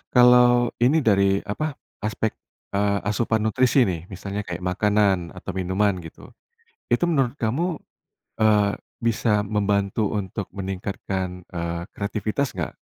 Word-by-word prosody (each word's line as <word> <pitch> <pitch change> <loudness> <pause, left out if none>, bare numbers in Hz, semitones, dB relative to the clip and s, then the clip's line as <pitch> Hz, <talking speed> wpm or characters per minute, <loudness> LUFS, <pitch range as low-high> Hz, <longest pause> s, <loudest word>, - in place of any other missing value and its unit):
Kalau, 125 -1 +6
ini 140 +6 +3
dari, 100 -3 +3
apa, 150 +8 -3 0.2
aspek, 110 0 -1 0.4
eee, 100 0 +1
asupan 110 +2 0
nutrisi 125 +4 +3
nih, 90 -5 -3
misalnya 100 +2 -5
kayak, 90 0 -5
makanan, 95 -1 +1
atau - - -6
minuman, 95 +1 0
gitu. 80 -2 -12 0.6
Itu, 175 - +3
menurut 140 -5 +1
kamu, 155 +9 -1 0.6
eee, 105 -2 +4 0.3
bisa 105 -2 +1
membantu 100 0 0
untuk 100 +1 -5
meningkatkan, 95 -1 -4
eee, 85 0 -3
kreativitas 110 +6 -2
nggak? - - -4
105 Hz, 120 wpm, -24 LUFS, 95-115 Hz, 0.6 s, Kalau